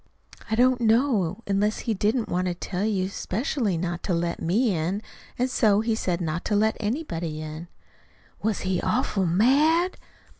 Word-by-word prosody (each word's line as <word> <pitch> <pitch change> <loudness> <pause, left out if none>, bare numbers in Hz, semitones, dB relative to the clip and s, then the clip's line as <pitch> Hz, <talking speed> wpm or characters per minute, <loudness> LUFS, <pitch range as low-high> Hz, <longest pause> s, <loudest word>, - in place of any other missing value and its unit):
"I 220 - +1
don't 250 +1 +3
know 230 - +2
unless 205 +2 0
he 230 - -1
didn't 215 +4 0
want 180 +1 -1
to 175 - -1
tell 180 +2 -3
you 195 -4 0
specially 210 - -2
not 175 +1 -3
to 180 - +1
let 170 0 -2
me 205 +5 +2
in, 180 +7 -2 0.3
and 250 - +1
so 215 -5 +3
he 225 0 0
said 180 -5 -1
not 165 0 -2
to 210 - +1
let 220 +2 +2
anybody 190 - -3
in." 155 +2 -7 0.7
"Was 220 -1 -1
he 185 -1 -1
awful 195 -3 0
mad?" 295 - +3
205 Hz, 165 wpm, -25 LUFS, 175-230 Hz, 0.7 s, don't